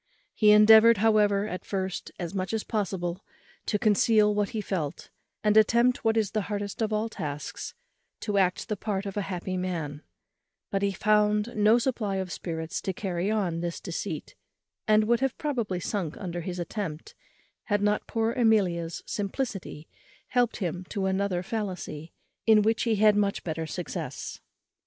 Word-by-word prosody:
He 215 Hz, -, +4 dB
endeavoured, 220 Hz, +2 st, +8 dB
however, 210 Hz, -1 st, +3 dB
at 180 Hz, -3 st, -5 dB
first, 190 Hz, -2 st, -3 dB
as 175 Hz, 0 st, -4 dB
much 190 Hz, +1 st, -2 dB
as 220 Hz, -, -1 dB
possible, 190 Hz, -4 st, -2 dB, 0.4 s
to 210 Hz, -, +1 dB
conceal 210 Hz, 0 st, +4 dB
what 205 Hz, -1 st, 0 dB
he 225 Hz, -, -3 dB
felt, 170 Hz, -7 st, -4 dB, 0.3 s
and 210 Hz, 0 st, +3 dB
attempted 235 Hz, +3 st, +4 dB
what 225 Hz, 0 st, +2 dB
is 210 Hz, -3 st, +1 dB
the 215 Hz, -, 0 dB
hardest 205 Hz, 0 st, -3 dB
of 220 Hz, -1 st, 0 dB
all 215 Hz, +1 st, 0 dB
tasks, 150 Hz, -, -6 dB, 0.5 s
to 205 Hz, -2 st, 0 dB
act 185 Hz, -1 st, +1 dB
the 210 Hz, -, -1 dB
part 205 Hz, -1 st, -3 dB
of 195 Hz, -, -5 dB
a 205 Hz, -, 0 dB
happy 185 Hz, -1 st, -4 dB
man; 165 Hz, -5 st, -3 dB, 0.7 s
but 195 Hz, -, 0 dB
he 200 Hz, 0 st, +1 dB
found 210 Hz, +3 st, +2 dB
no 215 Hz, +2 st, +5 dB
supply 235 Hz, -5 st, -1 dB
of 190 Hz, -2 st, -3 dB
spirits 160 Hz, -2 st, -4 dB
to 190 Hz, -, -2 dB
carry 185 Hz, 0 st, -2 dB
on 190 Hz, -6 st, 0 dB
this 170 Hz, 0 st, -3 dB
deceit, -, -, -5 dB, 0.5 s
and 215 Hz, 0 st, +5 dB
would 235 Hz, +2 st, +2 dB
have 270 Hz, -1 st, -1 dB
probably 235 Hz, -, -2 dB
sunk 175 Hz, -3 st, -3 dB
under 175 Hz, -2 st, -4 dB
his 180 Hz, +1 st, -5 dB
attempt, 170 Hz, -2 st, -5 dB, 0.5 s
had 205 Hz, -1 st, 0 dB
not 210 Hz, 0 st, +1 dB
poor 225 Hz, 0 st, 0 dB
Amelia's 190 Hz, -9 st, +1 dB
simplicity 200 Hz, -, -4 dB, 0.4 s
helped 245 Hz, -2 st, +1 dB
him 180 Hz, -2 st, -3 dB
to 200 Hz, -3 st, -2 dB
another 190 Hz, -1 st, 0 dB
fallacy, 180 Hz, -7 st, -5 dB, 0.4 s
in 215 Hz, -1 st, +6 dB
which 225 Hz, +2 st, +1 dB
he 230 Hz, -2 st, +2 dB
had 210 Hz, 0 st, +5 dB
much 200 Hz, -1 st, 0 dB
better 160 Hz, -1 st, -3 dB
success. 175 Hz, +1 st, -5 dB
205 Hz, 165 wpm, -27 LUFS, 180-215 Hz, 0.7 s, endeavoured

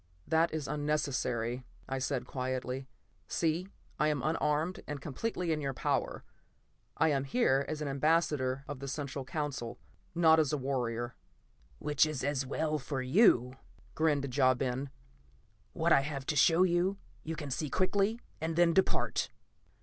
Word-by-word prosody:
"That 165 Hz, +1 st, +3 dB
is 155 Hz, -3 st, -3 dB
unnecessary," 135 Hz, -5 st, -1 dB, 0.2 s
I 135 Hz, 0 st, -2 dB
said 130 Hz, -1 st, -1 dB
quietly. 130 Hz, 0 st, -3 dB, 0.4 s
"See, 165 Hz, +3 st, 0 dB, 0.3 s
I 150 Hz, -, +3 dB
am 150 Hz, -4 st, 0 dB
unarmed 155 Hz, +2 st, 0 dB
and 150 Hz, -1 st, -4 dB
completely 170 Hz, -, -3 dB
in 155 Hz, -1 st, 0 dB
your 135 Hz, -2 st, -2 dB
power. -, -, -1 dB, 0.7 s
I 160 Hz, +1 st, +4 dB
am 135 Hz, -3 st, +1 dB
here 140 Hz, -, +2 dB
as 155 Hz, -1 st, -3 dB
an -, -, -3 dB
ambassador 140 Hz, -2 st, +1 dB
of 145 Hz, -3 st, -6 dB
the 140 Hz, -, -6 dB
Central 140 Hz, 0 st, -4 dB
Council, 135 Hz, -5 st, -4 dB, 0.4 s
not 160 Hz, -1 st, +6 dB
as 155 Hz, -2 st, +2 dB
a 150 Hz, -, +1 dB
warrior." 120 Hz, -3 st, -2 dB, 0.6 s
"Which 150 Hz, 0 st, +2 dB
is 150 Hz, -4 st, -3 dB
as 135 Hz, -1 st, 0 dB
well 155 Hz, +2 st, -1 dB
for 135 Hz, -1 st, -3 dB
you," 130 Hz, -, +4 dB, 0.4 s
grinned 145 Hz, -5 st, +1 dB
Ja 130 Hz, -2 st, +5 dB
Ben. 130 Hz, +2 st, -2 dB, 0.8 s
"What -, -, +3 dB
I -, -, +6 dB
have 135 Hz, -1 st, -4 dB
to 150 Hz, -, -1 dB
show 165 Hz, +5 st, +5 dB
you, 185 Hz, +2 st, +2 dB, 0.3 s
you 160 Hz, +1 st, -4 dB
can 145 Hz, -3 st, -6 dB
see 145 Hz, +3 st, -2 dB
quickly, 200 Hz, -, +1 dB, 0.2 s
and 160 Hz, 0 st, -1 dB
then 170 Hz, 0 st, +4 dB
depart." 190 Hz, -, +1 dB
145 Hz, 155 wpm, -32 LUFS, 130-160 Hz, 0.8 s, not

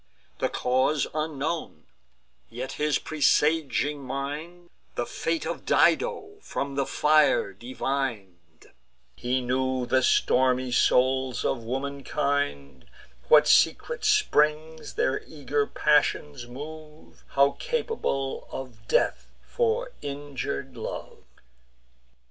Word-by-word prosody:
The -, -, +1 dB
cause 130 Hz, +4 st, +1 dB
unknown; 155 Hz, +1 st, -3 dB, 0.7 s
yet 125 Hz, +3 st, -5 dB
his 150 Hz, 0 st, +1 dB
presaging 150 Hz, -2 st, +1 dB
mind 150 Hz, +7 st, -6 dB, 0.2 s
The -, -, -1 dB
fate 330 Hz, -, -2 dB
of -, -, -4 dB
Dido 425 Hz, -4 st, +2 dB
from 140 Hz, -, -4 dB
the 135 Hz, -1 st, -1 dB
fire 150 Hz, -9 st, +3 dB
divin'd; 105 Hz, -, -5 dB, 0.4 s
He 125 Hz, -, -1 dB
knew 130 Hz, 0 st, 0 dB
the 130 Hz, +1 st, +2 dB
stormy 130 Hz, 0 st, +2 dB
souls 130 Hz, 0 st, +2 dB
of 120 Hz, -4 st, -1 dB
womankind, 135 Hz, -, -2 dB, 0.4 s
What 150 Hz, -1 st, +7 dB
secret 465 Hz, -, +3 dB
springs 160 Hz, -, +1 dB
their 130 Hz, -, 0 dB
eager 145 Hz, -1 st, -1 dB
passions 145 Hz, -3 st, +1 dB
move, 150 Hz, +4 st, -11 dB
How 140 Hz, 0 st, +4 dB
capable 455 Hz, -, -2 dB
of 120 Hz, -4 st, -8 dB
death -, -, +1 dB, 0.2 s
for 485 Hz, +1 st, 0 dB
injur'd 140 Hz, -2 st, -5 dB
love. 115 Hz, -, -7 dB
140 Hz, 95 wpm, -26 LUFS, 130-155 Hz, 0.7 s, What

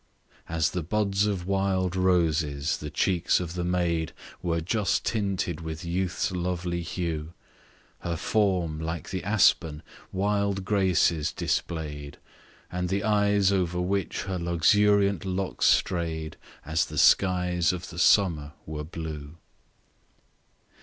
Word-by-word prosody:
As 80 Hz, -1 st, +1 dB
the 90 Hz, -, -2 dB
buds 100 Hz, +3 st, +1 dB
of 95 Hz, -4 st, -2 dB
wild 95 Hz, -1 st, 0 dB
roses, 80 Hz, -5 st, +1 dB
the 75 Hz, -, -6 dB
cheeks 90 Hz, +3 st, +1 dB
of 85 Hz, -2 st, -4 dB
the 90 Hz, -1 st, -3 dB
maid 85 Hz, -3 st, 0 dB, 0.3 s
Were 85 Hz, -2 st, 0 dB
just 95 Hz, +5 st, 0 dB
tinted 95 Hz, -6 st, -1 dB
with 80 Hz, +2 st, -6 dB
youth's 90 Hz, +1 st, -1 dB
lovely 90 Hz, -1 st, -2 dB
hue, 85 Hz, -2 st, -4 dB, 0.7 s
Her 85 Hz, -1 st, -3 dB
form, 90 Hz, -4 st, 0 dB
like 80 Hz, +1 st, -4 dB
the 95 Hz, -1 st, -3 dB
aspen, 85 Hz, -6 st, +2 dB, 0.3 s
wild 100 Hz, 0 st, 0 dB
graces 90 Hz, -6 st, +2 dB
display'd, 75 Hz, -4 st, -3 dB, 0.5 s
And 90 Hz, 0 st, -2 dB
the 100 Hz, +2 st, 0 dB
eyes, 105 Hz, -2 st, +3 dB
over 90 Hz, -2 st, 0 dB
which 95 Hz, +2 st, -1 dB
her 95 Hz, -2 st, -3 dB
luxuriant 100 Hz, +3 st, +3 dB
locks 95 Hz, 0 st, -1 dB
stray'd, 80 Hz, -3 st, +1 dB, 0.3 s
As 80 Hz, +1 st, +1 dB
the -, -, -8 dB
skies 90 Hz, -2 st, +4 dB
of 90 Hz, -1 st, -6 dB
the 85 Hz, -, -7 dB
summer 80 Hz, -6 st, +3 dB
were 75 Hz, -1 st, -5 dB
blue. 80 Hz, -1 st, -7 dB
90 Hz, 125 wpm, -27 LUFS, 80-95 Hz, 0.7 s, skies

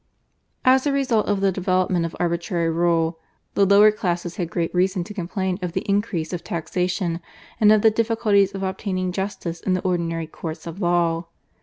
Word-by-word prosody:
As 260 Hz, +2 st, +5 dB
a -, -, +2 dB
result 260 Hz, -6 st, +1 dB
of 205 Hz, -1 st, 0 dB
the 195 Hz, -1 st, +3 dB
development 185 Hz, -1 st, +1 dB
of 165 Hz, -, -10 dB
arbitrary 170 Hz, -1 st, 0 dB
rule 165 Hz, -1 st, +1 dB, 0.3 s
the 200 Hz, -1 st, +3 dB
lower 205 Hz, +2 st, +7 dB
classes 175 Hz, -4 st, -3 dB
had 175 Hz, -3 st, -2 dB
great 170 Hz, -1 st, -2 dB
reason 185 Hz, 0 st, +1 dB
to 210 Hz, -, -9 dB
complain 190 Hz, 0 st, -2 dB
of 180 Hz, -2 st, -3 dB
the -, -, -1 dB
increase 200 Hz, -5 st, -1 dB
of 175 Hz, -1 st, -4 dB
taxation 180 Hz, +1 st, -2 dB, 0.4 s
and 210 Hz, -1 st, +6 dB
of 215 Hz, -1 st, +4 dB
the 220 Hz, -, +6 dB
difficulties 215 Hz, -3 st, +2 dB
of 195 Hz, -, -4 dB
obtaining 190 Hz, -1 st, -2 dB
justice 185 Hz, -3 st, -4 dB
in 185 Hz, -, 0 dB
the 185 Hz, -, 0 dB
ordinary 170 Hz, -3 st, -1 dB
courts 160 Hz, 0 st, -7 dB
of 170 Hz, +4 st, -7 dB
law. 170 Hz, -1 st, +1 dB
185 Hz, 180 wpm, -23 LUFS, 170-200 Hz, 0.4 s, lower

